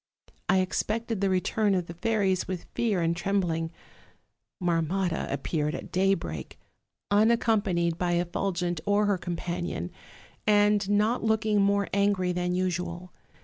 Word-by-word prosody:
"I 190 0 +5
expected 220 +3 -2
the 195 - +2
return 195 +2 +1
of 180 -2 0
the 170 - -8
fairies 195 -1 0
with 185 -2 -4
fear 215 -6 +1
and 165 +1 +1
trembling. 170 -3 -1 0.9
Marmotta 175 0 0
appeared 150 +2 -1
at - - -8
daybreak, 180 - -1 0.5
unaccom 220 +1 +4
panied 170 -4 0
by 175 -1 +1
Effulgent 175 -1 -1
or 205 +1 +3
her 200 -3 +1
companion, 175 - -4 0.6
and 205 -1 +4
not 210 +4 +2
looking 220 -2 +2
more 200 0 +2
angry 200 -2 +2
than 180 0 -1
usual. 180 -1 -2
185 Hz, 130 wpm, -27 LUFS, 175-205 Hz, 0.9 s, I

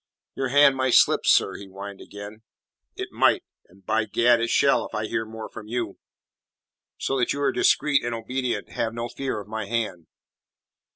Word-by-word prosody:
"Your 135 - -2
hand 140 +1 +5
might 130 -1 +2
slip, - - +4
sir," - - +4
he 100 - -10
whined 100 +1 -9
again. 105 +2 -10 0.5
"It - - -5
might - - +3 0.2
and, 95 +1 -23
by 110 +1 +1
Gad, 115 +2 +3
it 115 - 0
shall 140 - +3
if - - -9
I 110 - -1
hear 110 +1 -2
more 110 0 -8
from 110 -1 -10
you. 115 -3 -3 1.0
So 135 - -1
that 125 - +1
you 140 - -4
are - - +3
discreet 150 -2 +2
and 120 -1 -2
obedient, 125 +2 -3
have 115 0 -2
no 120 0 -4
fear 130 -1 -3
of 100 - -10
my 110 -1 -4
hand." 100 -8 -3
115 Hz, 185 wpm, -25 LUFS, 105-125 Hz, 1.0 s, hand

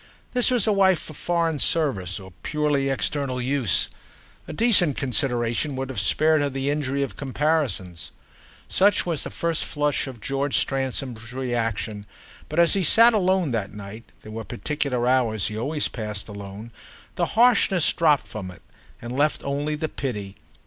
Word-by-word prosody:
This 250 -1 +2
was 245 -5 +2
a 215 - +3
wife 190 -2 +4
for 155 - -9
foreign 165 -1 -1
service 110 - +1
or 95 -2 -12
purely 150 -2 0
external 135 -1 0
use; 125 -4 +1 0.6
a - - -6
decent 180 - +3
consideration 125 +1 0
would 135 0 -4
have 130 - -3
spared 155 +10 +3
her 145 - +1
the 135 +1 -2
injury 140 -2 -1
of 140 - -5
comparisons. 135 - -1 0.6
Such 200 +1 +3
was 165 -5 -1
the - - -5
first 165 -1 -1
flush 145 -1 -1
of 130 -3 -8
George 140 +4 -1
Stransom's 130 -3 -2
reaction; 115 -5 -3 0.4
but 155 - -5
as 170 -1 +5
he 195 - +2
sat 230 +8 +6
alone 185 -6 +2
that 105 -3 -3
night—there 105 +1 -11
were 110 +1 -5
particular 125 +2 -2
hours 115 -6 +2
he 105 - -6
always 145 +5 0
passed 105 -3 -5
alone—the 105 - -7
harshness 220 -7 +4
dropped 155 -4 +3
from 100 -4 -7
it 90 - -14 0.4
and 120 +1 -5
left 150 +3 +1
only 145 +2 -2
the 155 +1 -2
pity. 105 -10 -5
135 Hz, 155 wpm, -24 LUFS, 115-155 Hz, 0.6 s, sat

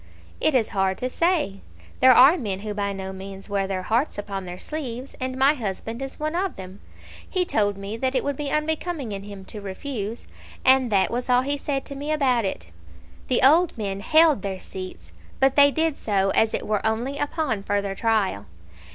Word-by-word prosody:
"It 310 - +2
is 230 -4 +2
hard 190 -1 0
to 255 0 -3
say. 320 - 0 0.4
There 260 - +7
are 270 +8 +8
men 200 - -3
who 210 0 -4
by 200 -1 -2
no 190 -1 -5
means 195 0 -9
wear 200 -2 -1
their 190 -1 -3
hearts 235 +9 0
upon 195 -2 -5
their 180 0 -7
sleeves, 260 0 -6
and 255 0 -3
my 270 +2 +5
husband 225 -1 -5
is 270 0 -6
one 305 +1 -2
of 375 +1 -1
them. 190 +1 -10 0.5
He 365 -2 +1
told 205 - 0
me 200 +3 -5
that 260 +2 -1
it - - +1
would 285 0 -1
be 290 0 -3
unbecoming 305 -3 -1
in 195 -1 -4
him 200 -1 -10
to 210 - -8
refuse, 210 +2 -5 0.4
and 260 -2 +5
that 195 -2 +3
was 245 +2 -3
all 250 0 +4
he 285 +2 0
said 275 -1 -3
to 280 - -8
me 290 +2 -4
about 255 -7 +2
it." 85 - -5 0.6
The 255 0 +2
old 325 +3 +5
men 195 -3 -3
held 310 +2 +4
their 190 -1 -4
seats, 185 - -9 0.3
but 270 0 +3
they 285 0 +7
did 320 +1 0
so 195 -2 +1
as 220 0 +2
it - - -4
were 210 -1 -1
only 235 +6 -1
upon 290 -7 -1
further 200 0 -1
trial. 205 - 0
230 Hz, 205 wpm, -24 LUFS, 195-280 Hz, 0.6 s, are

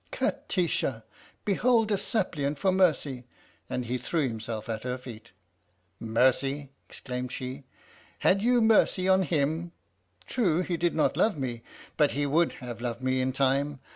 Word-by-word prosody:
" - - -38
" - - -35
Kati 180 -3 0
sha! 125 -6 -1 0.4
behold 225 +2 +2
a - - +4
suppliant 165 - -1
for 190 +6 +2
mercy! 150 -9 +1 0.2
" - - -34
And 125 - -2
he 125 +2 -2
threw 150 +3 0
himself 110 -1 -5
at 110 -2 -3
her 125 +1 -3
feet. 120 -5 -11 0.7
"Mercy?" 130 +5 +1 0.2
exclaimed 125 0 -5
she. 130 +2 -6 0.3
" - - -27
Had 195 +1 +4
you 240 +1 +3
mercy 210 -4 +4
on 190 0 +5
him? 160 +1 -1 0.5
True, 180 -9 +1
he 180 -1 -2
did 170 0 0
not 155 - +1
love 215 -6 +2
me, 125 -4 -4 0.4
but 150 -2 +3
he 145 +1 0
would 160 +4 +2
have 120 -2 -8
loved 120 0 -4
me 130 0 +1
in 130 0 0
time. 135 +1 +1
140 Hz, 170 wpm, -28 LUFS, 125-180 Hz, 0.7 s, on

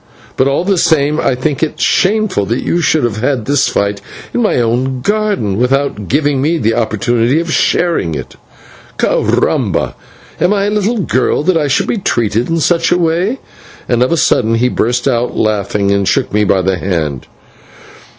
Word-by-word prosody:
But, 130 - +2
all 140 +5 0
the 195 -2 +1
same, 150 -1 +2
I 130 - +1
think 135 +3 -2
it 160 - -2
shameless 195 - +1
that 115 - -1
you 175 - 0
should 155 -3 +1
have 115 -3 -1
had 125 0 -1
this 145 -1 +2
fight 100 0 -1 0.3
in 245 - 0
my 220 - +1
own 125 +2 -1
garden, 205 - -1
without 125 -5 0
giving 145 0 +1
me 160 +4 +1
the 115 -6 0
opportunity 120 +4 0
of 165 -1 -3
sharing 165 - +1
it. - - -7 0.6
/Caramba!/ - - 0 0.5
am 180 +3 +2
I 200 0 0
a - - 0
little 210 +2 0
girl 130 - 0
that 185 +2 +2
I 155 -3 +1
should 135 - +1
be - - -1
treated 115 - -1
in 165 0 0
such 165 +1 +1
a 175 - +4
way?" 175 +8 0 0.5
And 120 -1 +1
of 125 - +2
a 170 - +2
sudden 115 -6 +2
he 125 +2 +1
burst 125 +2 -1
out 120 -2 -1
laughing 100 -1 0
and 100 -1 +1
shook - - 0
me 105 0 +2
by 95 -1 +2
the 95 0 0
hand. 80 -8 -3
130 Hz, 185 wpm, -14 LUFS, 110-165 Hz, 0.6 s, a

